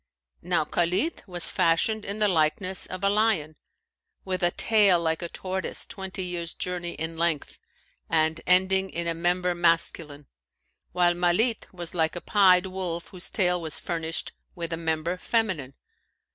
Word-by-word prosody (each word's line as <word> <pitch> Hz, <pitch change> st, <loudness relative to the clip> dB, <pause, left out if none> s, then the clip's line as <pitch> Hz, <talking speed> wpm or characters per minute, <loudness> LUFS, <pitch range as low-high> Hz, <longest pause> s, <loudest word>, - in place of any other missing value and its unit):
Now -, -, 0 dB
Khalνt 185 Hz, -, 0 dB
was 175 Hz, -2 st, -6 dB
fashioned 185 Hz, +5 st, +1 dB
in 200 Hz, +1 st, -4 dB
the 210 Hz, -1 st, +3 dB
likeness 185 Hz, +2 st, 0 dB
of 185 Hz, +1 st, -7 dB
a 200 Hz, -, +4 dB
lion, 205 Hz, -8 st, +1 dB, 0.7 s
with 185 Hz, -1 st, -2 dB
a 175 Hz, -, +4 dB
tail 205 Hz, -2 st, +4 dB
like 160 Hz, 0 st, -1 dB
a 170 Hz, -, -4 dB
tortoise 190 Hz, +2 st, -4 dB
twenty 190 Hz, -1 st, -6 dB
years' 170 Hz, -2 st, -4 dB
journey 175 Hz, -1 st, -3 dB
in 160 Hz, +2 st, -5 dB
length 170 Hz, -3 st, -1 dB, 0.5 s
and 160 Hz, 0 st, +1 dB
ending 190 Hz, +1 st, +4 dB
in 170 Hz, -1 st, -3 dB
a 170 Hz, -, 0 dB
member 180 Hz, +2 st, 0 dB
masculine; 165 Hz, -4 st, +1 dB, 0.7 s
while 175 Hz, -1 st, +3 dB
Malνt 180 Hz, +7 st, +1 dB
was 175 Hz, -3 st, -3 dB
like 160 Hz, -2 st, +1 dB
a 175 Hz, -, -4 dB
pied 185 Hz, -3 st, +4 dB
wolf 185 Hz, -3 st, -4 dB
whose 180 Hz, -2 st, -3 dB
tail 180 Hz, -3 st, +1 dB
was 160 Hz, -2 st, -1 dB
furnished 165 Hz, -1 st, -3 dB, 0.2 s
with 170 Hz, -1 st, -4 dB
a -, -, +1 dB
member 165 Hz, +1 st, -2 dB
feminine. 180 Hz, -, -1 dB
175 Hz, 155 wpm, -26 LUFS, 165-190 Hz, 0.7 s, a